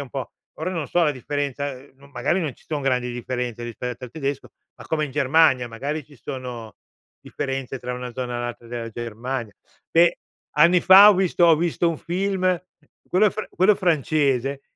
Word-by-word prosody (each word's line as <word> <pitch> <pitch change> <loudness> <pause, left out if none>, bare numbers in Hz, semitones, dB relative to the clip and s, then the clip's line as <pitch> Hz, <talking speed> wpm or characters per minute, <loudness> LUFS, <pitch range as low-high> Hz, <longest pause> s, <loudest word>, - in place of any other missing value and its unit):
un 140 - -7
po' 135 -2 -5 0.2
ora, 185 - -3
non 165 -6 -3
so 175 - +2
la 150 - +3
differenza, 140 +1 -3 0.2
magari 140 +6 -2
non 150 -7 -3
ci - - -25
son 150 -2 -3
grandi 125 -2 0
differenze 120 -1 -4
rispetto 120 +1 -6
al 120 - -10
tedesco, 140 -1 -4 0.3
ma - - -12
come 155 -1 0
in - - -10
Germania 140 -3 +3
magari 140 +6 -4
ci 145 - -19
sono 120 -4 -7 0.4
differenze 135 -1 -4
tra 125 0 -4
una 125 -1 -6
zona 125 -1 -4
e - - -3
l'altra 120 -1 -6
della 115 -1 -5
Germania. 120 0 -5 0.4
Beh, 170 +1 +4 0.4
anni 170 +3 +6
fa 195 +2 +9
ho - - +3
visto 185 -2 +2
ho 165 -2 +6
visto 170 +1 0
un 165 - -3
film, 185 0 0 0.5
quello 200 +2 +4
fr 215 - -6
quello 195 +3 +4
francese, 140 -5 +1
140 Hz, 180 wpm, -23 LUFS, 125-165 Hz, 0.5 s, fa